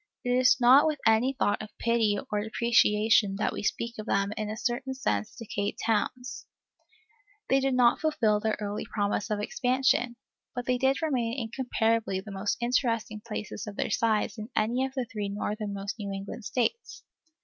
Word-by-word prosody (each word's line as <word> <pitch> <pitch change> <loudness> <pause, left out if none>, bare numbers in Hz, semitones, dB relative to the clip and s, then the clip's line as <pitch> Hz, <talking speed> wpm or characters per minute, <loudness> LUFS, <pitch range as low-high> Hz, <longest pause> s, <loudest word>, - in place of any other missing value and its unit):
It 245 - -1
is 250 0 +5
not 260 +5 +7
with 305 -1 0
any 225 +4 +4
thought 255 -6 0
of 215 - -10
pity 230 -3 +2
or 210 0 0
depreciation 215 -2 +3
that 210 - -1
we - - -4
speak 235 +2 -2
of 215 - -6
them 200 +1 +1
as 215 - -4
in 210 - -3
a 215 - -4
certain 255 +3 -2
sense 105 - -2
decayed 205 -3 -3
towns; 245 +3 -1 1.0
they 270 - +5
did 270 -1 +1
not 245 -1 +4
fulfil 225 -10 +2
their 220 0 -1
early 205 0 -3
promise 205 -1 -2
of 210 -1 -1
expansion, 245 +2 +1 0.4
but 245 -1 -3
they 250 -1 +1 0.2
remain 245 -5 0
incomparably 225 -4 0
the 205 +2 -9
most 195 +1 -1
interesting 230 -3 0
places 215 0 -5
of 205 - -6
their - - -2
size 220 +1 +1
in 215 +2 -6
any 235 +4 +1
of 265 - -14
the 260 -2 -1
three 210 -3 -4
northernmost 205 0 -4
New 200 -1 -4
England 200 +3 -6
States. 255 - -2
225 Hz, 175 wpm, -28 LUFS, 210-245 Hz, 1.0 s, not